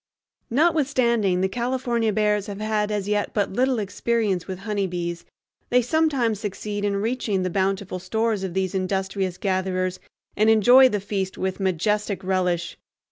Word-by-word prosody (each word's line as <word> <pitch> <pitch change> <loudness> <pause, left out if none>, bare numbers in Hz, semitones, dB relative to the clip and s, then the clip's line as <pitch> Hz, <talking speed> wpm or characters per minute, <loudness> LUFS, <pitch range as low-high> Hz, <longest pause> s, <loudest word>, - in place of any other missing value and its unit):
Notwithstanding 255 - +2
the 190 - +2
California 240 0 -1
bears 210 -1 +1
have 200 -1 -6
had 215 -1 0
as 205 -2 -2
yet 210 0 -1
but 205 -2 0
little 255 +3 +2
experience 210 -2 -1
with 190 -1 -5
honeybees, 180 -5 -3 0.4
they 250 0 +3
sometimes 260 -6 +1
succeed 205 0 -4
in 205 -1 0
reaching 210 -2 -1
the 185 - -2
bountiful 190 0 -1
stores 220 +1 -1
of 185 -2 -4
these 190 0 -1
industrious 190 -1 -2
gatherers 185 -1 -1 0.4
and 215 +1 +3
enjoy 245 +4 +7
the 210 - -1
feast 195 -1 -3
with 190 0 -2
majestic 200 +2 0
relish. 180 -2 -1
205 Hz, 145 wpm, -24 LUFS, 190-225 Hz, 0.4 s, enjoy